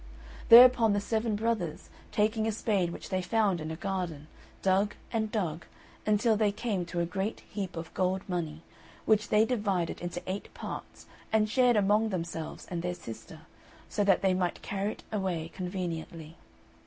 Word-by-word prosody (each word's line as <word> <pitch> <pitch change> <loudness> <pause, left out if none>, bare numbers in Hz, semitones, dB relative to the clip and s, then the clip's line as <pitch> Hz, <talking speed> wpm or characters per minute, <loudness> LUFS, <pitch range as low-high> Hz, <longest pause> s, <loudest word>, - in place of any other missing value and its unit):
Thereupon 235 -2 +9
the 205 - +2
seven 220 +1 -1
brothers, 210 -7 -2 0.2
taking 215 +1 +1
a - - +1
spade 205 -5 0
which - - -8
they 185 0 0
found 195 -2 +1
in 155 - -4
a 160 - -4
garden, 180 -5 -3 0.4
dug 195 +2 +2 0.2
and 220 -2 0
dug, 170 -7 -2 0.4
until 215 +2 +3
they 210 -1 +2
came 200 -4 -2
to 175 0 -2
a - - +1
great 195 +5 -3
heap 190 -4 -5
of 165 0 -6
gold 185 +1 0
money, 165 -4 -3 0.4
which 210 -1 +3
they 215 +1 +5
divided 200 -8 -1
into 175 0 -4
eight 190 +2 -5
parts - - -7 0.3
and 220 -1 +3
shared 245 +2 +4
among 210 +2 +3
themselves 165 -4 -4
and 170 -2 -2
their 180 +1 -2
sister, 115 -9 -10 0.5
so 205 - 0
that 195 -1 +3
they 190 -1 +4
might 180 -1 -1
carry 200 +1 -2
it - - -16
away 180 -6 -2
conveniently. 170 -3 -5
195 Hz, 165 wpm, -30 LUFS, 175-215 Hz, 0.5 s, Thereupon